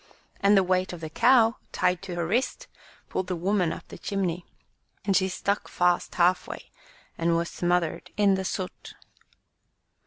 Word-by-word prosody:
And 200 0 +5
the 195 - +5
weight 185 0 0
of 175 - -7
the 160 -1 -6
cow 235 +2 +4
tied 180 0 +1
to 190 -3 -6
her 170 -1 -1
wrist 230 +10 -1 0.4
pulled 185 - -3
the 185 - -2
woman 180 0 +1
up - - -8
the - - -10
chimney, 180 -3 -2 0.6
and 195 -2 +2
she 190 0 +3
stuck 200 +2 -1
fast 175 0 +1
half 180 +1 +3
way - - -9 0.5
and 170 0 +2
was 170 0 -1
smothered 175 -2 -1
in 205 -1 +4
the 190 0 -1
soot. 185 0 -5
185 Hz, 165 wpm, -26 LUFS, 175-195 Hz, 0.6 s, And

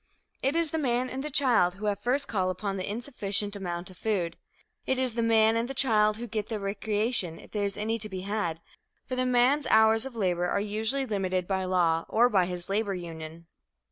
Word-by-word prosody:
It 270 +4 +1
is 335 -2 +2
the 320 - -1
man 255 -2 0
and 265 +1 -4
the 300 - -4
child 245 -11 +3
who 205 +2 -6
have 205 -1 0
first 260 +6 0
call 190 -4 0
upon 195 +2 -3
the 185 - -3
insufficient 205 -3 -2
amount 180 -2 -4
of 185 - -16
food. 190 -6 -1 0.5
It 265 - +1
is 255 -2 0
the 235 - -1
man 225 -1 +4
and 230 +2 -1
the 270 - -5
child 215 -5 +3
who 240 - -5
get 215 -2 -4
the 220 -2 -2
recreation, 205 -2 -1
if - - -15
there 205 -1 -1
is 200 - -3
any 225 +2 -1
to 215 0 -6
be 190 -2 -5
had, 185 -5 -2 0.4
for 255 - -4
the 255 0 0
man's 255 +4 +3
hours 220 +2 +5
of 260 - -11
labor 180 -4 0
are 200 - 0
usually 220 +6 0
limited 185 -5 -1
by 190 -1 -1
law 170 -3 +2
or 240 +2 +4
by 190 -6 +3
his 180 -1 -6
labor 200 0 0
union. 165 -1 -8
210 Hz, 220 wpm, -28 LUFS, 185-240 Hz, 0.5 s, hours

